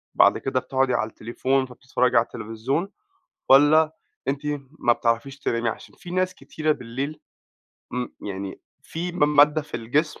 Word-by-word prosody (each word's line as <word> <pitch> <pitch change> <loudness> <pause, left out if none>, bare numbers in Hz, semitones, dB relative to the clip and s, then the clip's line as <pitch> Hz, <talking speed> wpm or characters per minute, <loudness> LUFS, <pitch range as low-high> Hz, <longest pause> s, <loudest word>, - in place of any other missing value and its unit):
بَعد - - +6
كده 135 -1 -1
بتقعُدي 130 0 0
على 110 -2 0
التليفون 130 +5 -1
فبتتفرّجي 125 -1 0
على 115 - +6
التلفزيون 115 - -3 0.6
والّا 155 +3 +6 0.3
أنتِ 140 +1 -1 0.4
ما 120 - +4
بتعرَفيش 120 +4 -1
تنامي 115 -2 0
عشان 115 - -8
في 175 - -10
ناس 185 0 0
كتيرة 155 0 -2
بالليل 135 +3 -4 0.7
امم، 125 0 -3
يعني 100 -1 -6 0.2
في 175 +2 -4
م 150 -3 +2
مادّة 150 +1 +6
في 150 - -6
الجسم 140 +7 -1
135 Hz, 145 wpm, -24 LUFS, 120-150 Hz, 0.7 s, بَعد